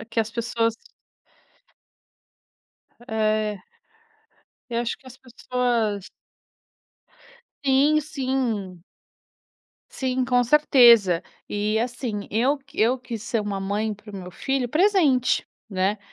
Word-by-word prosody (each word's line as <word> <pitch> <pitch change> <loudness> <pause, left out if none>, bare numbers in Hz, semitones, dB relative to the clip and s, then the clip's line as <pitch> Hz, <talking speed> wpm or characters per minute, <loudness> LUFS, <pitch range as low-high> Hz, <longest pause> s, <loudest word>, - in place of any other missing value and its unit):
é - - -8
que 230 0 -1
as 220 0 -3
pessoas 230 -1 -1 2.3
É. 215 -2 0 1.1
Eu 235 0 0
acho 235 - -3
que 270 - -23
as 255 -1 -12
pessoas 240 -5 -2 1.6
Sim, 280 +3 +4
sim. 255 - -3 1.1
Sim, 260 -1 -1
com 245 0 +3
certeza. 235 - +6 0.3
E, 210 +1 0
assim, 235 -3 -3
eu 255 +7 +1
q 270 - -18
eu 240 +4 +3
quis 235 -4 -7
ser 230 -1 -1
uma 205 -1 -3
mãe 205 +3 -2
para 210 +1 -14
o - - -6
meu 180 -1 -8
filho 265 +6 -2
presente, 310 - +3 0.2
né. 195 +1 0
235 Hz, 110 wpm, -24 LUFS, 210-260 Hz, 2.3 s, certeza